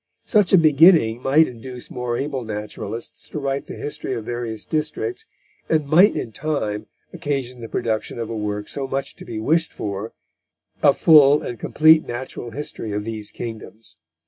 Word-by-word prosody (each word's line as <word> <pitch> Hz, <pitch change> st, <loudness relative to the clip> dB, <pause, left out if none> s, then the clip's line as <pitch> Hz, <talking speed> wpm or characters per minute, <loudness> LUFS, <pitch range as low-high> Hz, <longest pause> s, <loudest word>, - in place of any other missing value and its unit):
Such 210 Hz, -3 st, +3 dB
a 190 Hz, -, +8 dB
beginning 155 Hz, -7 st, +5 dB
might 150 Hz, +5 st, +4 dB
induce 125 Hz, +1 st, -8 dB
more 125 Hz, -1 st, -3 dB
able 135 Hz, -2 st, -3 dB
naturalists 110 Hz, +2 st, -6 dB
to -, -, -6 dB
write 140 Hz, -1 st, -2 dB
the -, -, -7 dB
history 145 Hz, -3 st, -3 dB
of 115 Hz, -2 st, -5 dB
various 120 Hz, -2 st, -4 dB
districts, 380 Hz, -, -3 dB, 0.4 s
and 155 Hz, -2 st, +2 dB
might 175 Hz, +8 st, +6 dB
in 115 Hz, -, -4 dB
time 110 Hz, -7 st, -3 dB, 0.3 s
occasion 130 Hz, -4 st, -3 dB
the 115 Hz, -, -7 dB
production 110 Hz, 0 st, -2 dB
of 115 Hz, -1 st, -3 dB
a 115 Hz, -, -5 dB
work 105 Hz, -1 st, -3 dB
so 135 Hz, -1 st, -3 dB
much 135 Hz, +1 st, -3 dB
to -, -, -11 dB
be 110 Hz, -2 st, -5 dB
wished 160 Hz, +8 st, +1 dB
for, 100 Hz, +2 st, -5 dB, 0.7 s
a -, -, +5 dB
full 150 Hz, -2 st, +6 dB
and 120 Hz, -, -6 dB
compleat 155 Hz, +1 st, +4 dB
nat: 120 Hz, +2 st, -5 dB
history 120 Hz, -3 st, -6 dB
of 105 Hz, 0 st, -2 dB
these 110 Hz, -1 st, -5 dB
kingdoms." 110 Hz, -5 st, -8 dB
125 Hz, 170 wpm, -22 LUFS, 110-150 Hz, 0.7 s, a